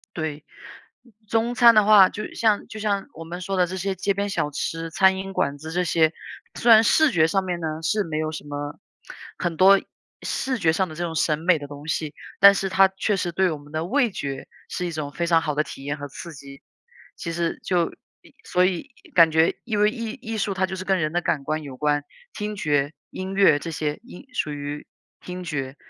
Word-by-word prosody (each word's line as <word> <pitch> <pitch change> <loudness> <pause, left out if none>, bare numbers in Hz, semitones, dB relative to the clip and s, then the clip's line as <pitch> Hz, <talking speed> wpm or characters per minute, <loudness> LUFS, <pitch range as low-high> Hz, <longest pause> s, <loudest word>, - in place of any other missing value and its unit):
对。 155 -2 -4 0.8
中 225 +2 0
餐 235 -1 +7
的 215 -1 +6
话 205 -3 +8
就 215 - -7
像 215 -3 +1
就 215 - -8
像 200 -2 -1
我 165 - -8
们 175 +2 -7
说 195 +1 -3
的 180 - +3
这 180 - -6
些 195 +1 -2
街 200 - 0
边 200 +1 -2
小 170 -6 -1
吃、 165 +3 -4
苍 190 +3 +4
蝇 190 0 -5
馆 140 -6 0
子 160 +3 -8
这 180 +2 +1
些， 160 -2 +3 0.4
虽 235 - +2
然 220 0 +8
视 315 +5 +4
觉 160 -5 +4
上 195 +4 +1
面 180 -2 -3
呢 155 -1 -3
是 210 +5 +1
没 155 -3 -3
有 155 0 -1
什 155 - -7
么， 145 0 -6 0.6
很 175 -3 -2
多 195 +2 +6 0.4
视 260 -2 -2
觉 165 -6 +3
上 190 +3 +1
的 155 - -9
这 170 - -5
种 165 -1 -4
审 155 -1 +1
美 170 +1 +3
的 145 - -8
东 145 +2 -10
西， 155 -1 -2 0.2
但 200 0 +9
是 195 0 -1
它 190 +1 +5
确 210 0 +1
实 175 -2 -2
对 190 +1 +2
我 155 - -3
们 145 +1 -16
的 155 +1 -2
味 250 +3 +2
觉 135 -6 -5 0.2
是 180 - -4
一 170 - -4
种 155 -2 -4
非 170 - -2
常 165 -1 +4
好 155 -2 -2
的 150 +1 +1
体 135 - -10
验 145 +1 -2
和 145 -1 -7
刺 165 +4 -9
激。 140 -1 -12 0.6
其 170 - -5
实 170 0 -2
就 175 -3 +1 0.5
所 180 0 +2
以 190 +9 -3 0.2
感 165 -2 +7
觉 160 +1 +3
因 215 -3 -1
为 210 0 +4
艺 230 0 -5
艺 225 -2 -5
术 200 0 0
它 190 0 +1
就 190 +1 -6
是 185 - -6
跟 190 0 +1
人 155 -2 -1
的 175 - +1
感 140 -5 -1
官 155 +2 -2
有 140 -3 -9
关， 145 -1 +1 0.3
听 210 0 -4
觉、 145 -4 0 0.2
音 190 +1 -5
乐 195 -7 +5
这 165 - -6
些 150 -1 -3
应 255 +2 -13
属 150 - -1
于 145 0 -6 0.4
听 180 0 -7
觉， 135 -4 -4
170 Hz, 245 characters per minute, -24 LUFS, 155-195 Hz, 0.8 s, 但